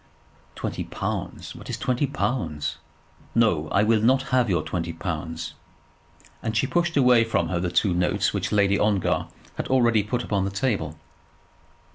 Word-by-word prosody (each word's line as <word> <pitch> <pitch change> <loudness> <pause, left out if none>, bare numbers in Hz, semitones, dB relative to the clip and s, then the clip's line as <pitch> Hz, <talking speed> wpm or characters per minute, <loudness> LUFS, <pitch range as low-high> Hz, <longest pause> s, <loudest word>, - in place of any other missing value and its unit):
"Twenty - - -3
pounds! - - -4
What - - -11
is - - -2
twenty 130 +1 0
pounds? 75 - -2 0.6
No; 90 -10 +3
I 100 - +3
will 110 0 +3
not 130 +4 +3
have 125 -3 +3
your 85 -4 +1
twenty 85 -2 -3
pounds." 80 -1 -4 0.9
And 110 -1 -2
she 120 - +3
pushed 170 +4 0
away 125 -4 +6
from 85 -7 0
her 90 - 0
the 90 0 -1
two 90 +2 +2
notes 90 0 +1
which - - -2
Lady 100 -1 +3
Ongar 105 -4 +1 0.3
had - - -3
already 120 -4 +4
put 120 +4 -2
upon 100 -2 0
the 95 - -1
table. 100 - -1
105 Hz, 160 wpm, -25 LUFS, 85-125 Hz, 0.9 s, away